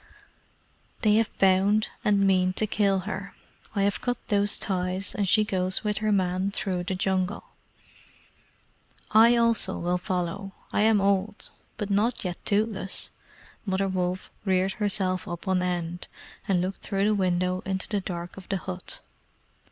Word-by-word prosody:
"They 210 -1 +5
have 225 -1 +2
bound 195 +3 +3
and 200 -1 +3
mean 185 -1 +3
to 215 - 0
kill 200 -2 +1
her. 200 +1 -6 0.4
I 200 - +2
have 200 +1 0
cut 245 -1 -1
those 205 0 +3
ties, 185 0 -1
and 200 -2 0
she 215 +2 +5
goes 185 -2 -1
with 210 -1 0
her 215 0 0
man 185 -1 +1
through 185 -3 -2
the 190 0 -2
Jungle." 185 +1 -1 1.6
"I 230 +3 +7
also 230 -5 +2
will 175 +1 0
follow. 185 +2 -3 0.2
I - - +2
am 220 -1 +4
old, 200 +1 0 0.3
but 205 -1 -3
not 220 +5 +1
yet 175 -1 -4
toothless." 205 -2 0 0.5
Mother 195 -1 0
Wolf 185 -1 -2
reared 190 -1 +2
herself 195 -1 +1
up 175 -1 -6
on 190 -1 +2
end, 175 -1 -3 0.4
and 185 -3 +2
looked 185 +2 -3
through 195 -1 0
the 215 - +3
window 185 -2 +1
into 190 0 -3
the 205 -2 -1
dark 175 -1 -6
of 190 - -11
the 195 - 0
hut. 185 - -7
195 Hz, 155 wpm, -26 LUFS, 185-205 Hz, 1.6 s, I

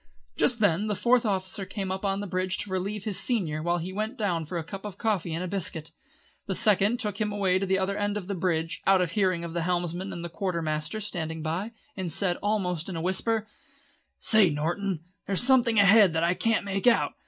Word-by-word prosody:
Just 240 -2 +2
then 205 0 +3
the 210 - 0
Fourth 240 +2 +3
Officer 190 0 -2
came 190 -1 -4
up 190 +1 -4
on 195 -1 0
to - - -3
the 205 - -4
bridge 185 0 -1
to 205 - -4
relieve 195 +2 -2
his 205 -3 -1
senior 170 -11 0
while 175 +2 +1
he 175 +2 -5
went 215 +6 -3
down 175 -7 -1
for 175 +3 -4
a 165 - -3
cup 195 +4 -8
of 205 -2 -7
coffee 205 -7 -1
and 165 +3 -2
a - - -3
biscuit. 170 -4 -3 0.6
The - - -1
Second 210 +2 +3
took 210 -3 -3
him 210 -1 0
away 190 -2 +1
to 195 - -2
the 190 0 +2
other 195 +1 -1
end 205 0 -1
of 200 - -5
the 200 - -3
bridge, 165 -3 -1
out 195 -1 +6
of 180 -2 0
hearing 185 -3 +1
of 165 - -7
the 170 - -1
helmsman 175 +2 -2
and 170 0 -6
the - - -2
quartermaster 170 0 -2
standing 160 -6 -3
by, 180 +8 -3 0.2
and 185 -4 -3
said 180 +2 0
almost 190 -5 -1
in 185 - -5
a - - -3
whisper: 215 +5 0 0.7
"Say, 215 -5 +5
Norton, 165 +4 -2 0.2
there's 195 +3 +2
something 245 -4 +4
ahead 200 -2 +6
there 160 - 0
that - - +1
I 170 +1 +3
can't 215 +4 0
make 195 +3 -1
out. 240 - +4
190 Hz, 235 wpm, -27 LUFS, 175-205 Hz, 0.7 s, out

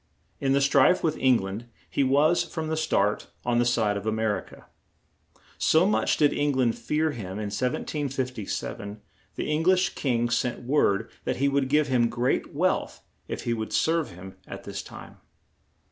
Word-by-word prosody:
In 135 -1 +1
the 140 - +3
strife 140 +5 +4
with 155 -2 +1
Eng 130 -2 +5
land 100 +5 -6 0.2
he 140 - 0
was, 150 +6 +3
from 160 -2 -5
the 160 - 0
start, 105 -10 0 0.2
on 120 0 +2
the 120 - +3
side 110 -4 +1
of 100 +2 -6
A - - +2
mer 110 -2 0
i - - -8
ca. - - -16 0.9
So 160 +3 +4
much 210 - +2
did 145 -2 +4
Eng 145 0 +1
land 125 -3 +2
fear 155 +1 0
him 100 -9 -6
in 105 0 -4
1757, 125 -5 -3 0.4
the - - -3
Eng 150 +1 +1
lish 185 +1 +4
king 120 -3 -1
sent 125 +1 -1
word 115 -5 +1
that - - 0
he 140 - +2
would 140 -1 +1
give 150 +1 +3
him 120 -3 +2
great 120 +2 -1
wealth - - -1 0.2
if - - -5
he 120 - 0
would 110 -1 -4
serve 165 -1 +1
him 95 +1 -11
at - - -8
this - - -5
time. - - -12
130 Hz, 185 wpm, -26 LUFS, 110-150 Hz, 0.9 s, Eng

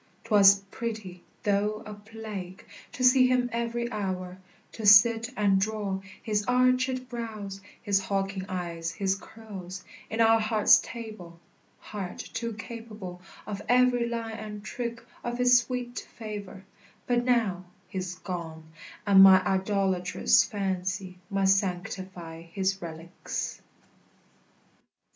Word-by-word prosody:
'Twas 200 -3 +6
pretty, 215 -6 -5 0.2
though 210 +1 0
a 210 - -7
plague, 205 -3 -8 0.3
To 255 - -4
see 255 0 +6
him 250 -1 +1
every 235 +1 -2
hour; 185 -3 -4 0.3
to 225 - -8
sit 225 +3 +7
and 195 -2 +3
draw 205 -2 -2 0.2
His 210 -2 0
archèd 255 +1 +2
brows, 215 -5 -6 0.2
his 200 -1 +2
hawking 195 0 -2
eye, 175 -2 -4 0.2
his 195 -2 +1
curls, 195 -3 -9 0.3
In 220 - -4
our 225 0 +6
heart's 215 -1 +5
table, 215 -8 -9 0.4
heart 195 -4 -7
too 230 -1 -5
capable 215 -5 -8 0.2
Of 205 -1 -5
every 245 -1 +4
line 225 -1 -4
and 210 -1 -7
trick 235 +1 -5 0.2
of 240 0 -3
his 250 0 +6
sweet 245 0 -4 0.2
favor: 205 -3 -7 0.4
But 245 -1 +1
now 225 -8 +1 0.2
he's 185 -1 -4
gone, 170 -4 -6 0.4
and 195 -2 +7
my 190 -1 +8
idolatrous 190 - +2
fancy 185 -2 -3
Must 195 -1 +3
sanctify 180 -3 -5
his 190 +3 -2
relics. 165 0 -6
205 Hz, 120 wpm, -28 LUFS, 185-230 Hz, 0.4 s, my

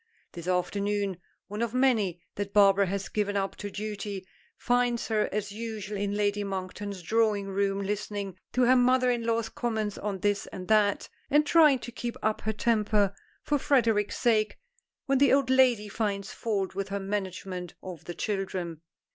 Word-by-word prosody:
This 170 -1 -8
afternoon, 200 +1 0 0.3
one 210 +3 -5
of 235 0 -1
many 215 -10 +2
that 200 0 -5
Barbara 200 -1 +6
has 195 +1 -2
given 205 -1 -1
up 195 0 -1
to 205 - -5
duty, 205 -1 -5 0.3
finds 245 -1 +1
her 215 -1 +1
as 205 0 -2
usual 215 -1 -5
in 200 0 -1
Lady 205 0 +1
Monkton's 195 0 -5
drawing 210 0 +1
room 195 0 0
listening 205 -1 -3 0.2
to 250 - +3
her 250 +1 +6
mother 250 0 +4
in 240 -1 -1
law's 230 -1 +1
comments 220 -3 -2
on 195 -2 -3
this 205 -1 0
and 185 -1 -8
that, 210 -2 +3 0.2
and 300 +1 +4
trying 300 -3 +6
to 240 - -8
keep 240 0 -5
up 215 0 0
her 220 - -1
temper, 210 -3 +2 0.3
for 295 -1 +1
Frederic's 230 -7 +2
sake, 215 -3 +2 0.5
when 275 -1 +2
the 280 -1 +5
old 270 -1 +3
lady 250 -5 +4
finds 200 -1 -2
fault 200 -4 -2
with 195 0 -3
her 200 0 -2
management 190 -3 -4
of 180 -5 -8
the 175 - -6
children. 185 -5 -3
205 Hz, 170 wpm, -28 LUFS, 195-230 Hz, 0.5 s, Barbara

